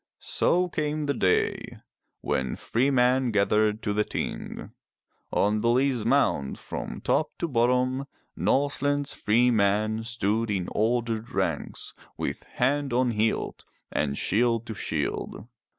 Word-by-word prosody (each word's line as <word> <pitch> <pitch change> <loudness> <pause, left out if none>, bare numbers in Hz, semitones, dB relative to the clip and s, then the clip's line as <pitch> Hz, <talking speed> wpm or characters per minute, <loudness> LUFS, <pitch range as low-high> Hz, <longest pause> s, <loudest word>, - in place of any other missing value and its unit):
So 180 +1 +2
came 150 -2 -2
the 140 - +1
day 95 -7 0 0.4
when 65 -1 -1
free 125 +4 0
men 130 -1 +3
gathered 105 +1 +2
to 105 - 0
the 105 +1 +2
Ting. - - -5 0.6
On 105 +1 +2
Bele's 125 +1 +2
mound 120 - +2
from - - -6
top - - +1
to 170 - -2
bottom 130 +1 +1 0.3
Norseland's 145 +1 +1
free 120 +4 +3
men 110 +1 +1
stood 115 -1 -1
in 95 -4 -1
ordered 115 0 0
ranks, - - -2 0.2
with - - -3
hand 140 +2 +1
on 125 0 +2
hilt, 110 0 -1 0.3
and 70 -1 -1
shield 115 +2 +1
to 115 - -5
shield. 100 - -3
115 Hz, 125 wpm, -26 LUFS, 105-130 Hz, 0.6 s, men